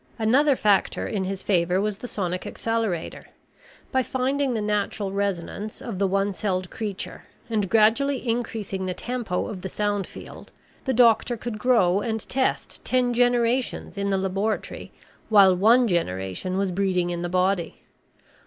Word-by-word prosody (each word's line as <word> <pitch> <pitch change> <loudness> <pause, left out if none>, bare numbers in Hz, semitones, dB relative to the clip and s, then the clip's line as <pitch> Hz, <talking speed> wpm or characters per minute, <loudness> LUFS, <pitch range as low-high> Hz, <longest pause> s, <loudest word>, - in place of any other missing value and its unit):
Another 265 +6 +3
factor 205 -5 +2
in 195 -3 -2
his 190 0 -4
favor 180 -1 +2
was 210 0 -2
the 245 - -6
sonic 180 -5 -3
accelerator. 225 -7 -3 0.6
By 260 - +2
finding 260 +1 -1
the - - 0
natural 210 -1 -1
resonance 200 +1 -3
of 225 -7 -6
the 200 - +2
one 195 +1 0
celled 185 -2 -2
creature 205 -3 -5 0.3
and 210 -4 0
gradually 240 +5 +3
increasing 220 -5 -2
the 180 - -2
tempo 235 -7 -2
of 190 -3 -6
the 190 - -5
sound 205 -1 -1
field, - - -11 0.3
the 265 - +1
doctor 235 0 +4
could 225 -1 -5
grow 205 -7 +3
and 220 +1 -3
test 260 0 -1
ten 250 -1 +1
generations 245 0 +1
in 200 0 -1
the 195 - +1
laboratory 195 +3 -2 0.4
while 195 -4 +7
one 230 +6 +5
generation 165 - -2
was 195 -1 0
breeding 180 -2 0
in 170 0 -3
the 175 - -3
body. 185 0 0
205 Hz, 155 wpm, -24 LUFS, 190-235 Hz, 0.6 s, while